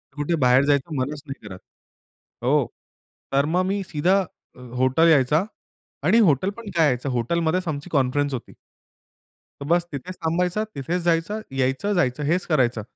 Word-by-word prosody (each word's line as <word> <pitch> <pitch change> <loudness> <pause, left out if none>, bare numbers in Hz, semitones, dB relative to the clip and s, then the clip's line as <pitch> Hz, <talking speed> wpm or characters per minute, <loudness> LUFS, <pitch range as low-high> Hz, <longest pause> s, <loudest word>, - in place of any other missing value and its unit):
कुठे 145 +3 -1
बाहेर 125 +2 +5
जायचं 145 +2 +1
मनच 145 +3 -3
नाही 135 -6 -8
करत. 95 -2 -9 0.8
हो. - - +3 0.7
तर 140 +1 +3
मग 180 +4 +1
मी 195 +1 -1
सीधा 180 +3 +1 0.6
हॉटेल 130 +6 +3
यायचो 150 +3 +4 0.6
आणि 230 - +4
हॉटेल 145 +7 +1
पण 230 -3 -8
काय? 150 -6 +4
हॉटेलमध्येच 165 +8 0
आमची 150 +2 -4
कॉन्फरन्स 140 +1 +1
होती. 125 - -6 1.1
तर 140 - -5
बस 175 +1 +2
तिथेच 175 +6 -6
थांबायचं, 180 +5 0
तिथेच 170 +6 -2
जायचं, 170 +5 0 0.2
यायचं, 135 +11 0
जायचं 150 -5 0
हेच 175 +5 0
करायचं. 125 -8 +1
150 Hz, 145 wpm, -23 LUFS, 135-175 Hz, 1.1 s, बाहेर